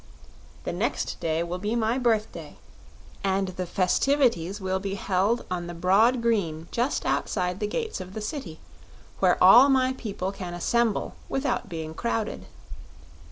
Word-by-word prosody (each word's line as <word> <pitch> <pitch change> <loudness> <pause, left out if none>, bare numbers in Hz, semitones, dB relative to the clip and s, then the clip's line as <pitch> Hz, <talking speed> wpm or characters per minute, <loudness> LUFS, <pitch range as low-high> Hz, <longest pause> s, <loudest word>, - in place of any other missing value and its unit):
The - - -3
next - - -2
day 160 0 0
will 175 +1 -4
be 210 +4 -2
my 230 +2 +1
birthday, 225 -3 -1 0.7
and 195 -1 +1
the 185 0 -5
festivities 195 - +1
will 190 -1 -1
be 195 0 -4
held 200 +4 0
on 175 -1 -3
the 175 - -7
broad 215 +8 +3
green 170 -9 0
just 245 +5 -1
outside 180 -1 -1
the 210 - -1
gates 440 - -3
of 185 +1 -9
the - - -3
City, 210 - -5 0.6
where 185 -2 +4
all 240 +9 +9
my 260 -1 +3
people 200 -6 -4
can 180 -3 -6
assemble 230 +4 0 0.2
without 270 -6 -1
being 160 -2 -5
crowded." 225 +3 -3
195 Hz, 150 wpm, -26 LUFS, 180-235 Hz, 0.7 s, all